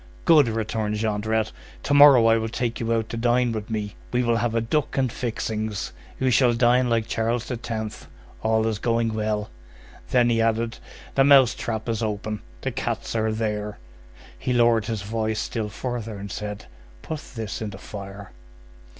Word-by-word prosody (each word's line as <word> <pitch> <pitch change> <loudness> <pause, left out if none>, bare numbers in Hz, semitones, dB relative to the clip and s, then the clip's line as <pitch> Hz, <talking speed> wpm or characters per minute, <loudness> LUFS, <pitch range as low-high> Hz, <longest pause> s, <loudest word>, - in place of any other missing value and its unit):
"Good," 150 -5 +6
returned 110 -1 -1
Jondrette. 110 0 0 0.3
"To 145 - 0
morrow 145 -5 +8
I 115 0 +5
will 110 0 -2
take 120 0 -2
you 115 0 -1
out 115 -1 +1
to 115 - -4
dine 120 +1 +2
with 110 -1 -4
me. 105 -2 -3 0.2
We 125 0 +1
will 120 -1 +2
have 115 -1 0
a - - +3
duck 140 +7 -1
and 130 -3 +2
fixings. 110 -4 -3 0.3
You 130 -1 +2
shall 120 -1 +4
dine 125 +1 +3
like 115 -1 +1
Charles 115 +1 -1
the 125 - -3
Tenth; 110 -2 -5 0.3
all 110 0 +2
is 110 -2 -1
going 115 -1 +1
well!" 105 -1 -2 0.6
Then 120 -1 +4
he 115 -1 +2
added:— 115 0 0 0.3
"The 135 - +4
mouse 135 -3 +7
trap 110 -2 -4
is 115 -1 -1
open. 105 -1 -3 0.2
The - - -2
cats - - -3
are 110 0 +1
there." 105 -1 -2 0.6
He 125 - -1
lowered 120 -3 +4
his 110 -3 -3
voice 110 +1 -1
still 110 -3 -3
further, 115 -2 -4
and 100 0 -7
said:— 105 0 -5 0.4
"Put 155 - -4 0.2
this 110 -3 -4
in 110 - -3
the 95 - -9
fire." 100 -1 -9
115 Hz, 180 wpm, -24 LUFS, 110-120 Hz, 0.6 s, morrow